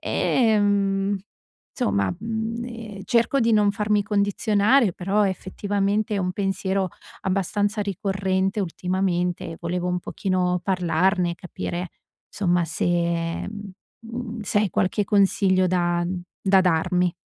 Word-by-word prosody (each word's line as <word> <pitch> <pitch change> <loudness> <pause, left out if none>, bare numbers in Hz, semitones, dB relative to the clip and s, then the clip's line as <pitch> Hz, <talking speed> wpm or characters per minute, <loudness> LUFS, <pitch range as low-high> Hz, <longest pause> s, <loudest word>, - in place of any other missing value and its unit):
Ehm, 205 -4 +2 0.5
insomma, 100 - 0
mhmm, 225 +2 -3
ehm, 225 -4 -8
cerco 235 +6 +2
di 230 -1 +3
non 210 -2 +4
farmi 210 -1 +1
condizionare, 205 +2 +2
però 200 +4 +1
effettivamente 200 +2 -1
è - - 0
un 180 -1 0
pensiero 195 -1 -1 0.3
abbastanza 205 +3 0
ricorrente 195 0 -1
ultimamente, 180 0 -1
e - - -9
volevo 175 +1 -2
un 180 0 0
pochino 180 -1 -1
parlarne, 180 0 +1
e - - -9
capire 175 0 -5 0.4
insomma 175 -3 +1
se, 160 - -2 0.6
mhmm, 205 -1 -8 0.3
mhmm, 230 0 -6
se 205 - +1
hai 210 -3 0
qualche 185 +5 +1
consiglio 195 -2 +3
da 175 -1 +1 0.4
da 190 -1 +5
darmi. 180 0 +2
195 Hz, 120 wpm, -24 LUFS, 180-210 Hz, 0.6 s, da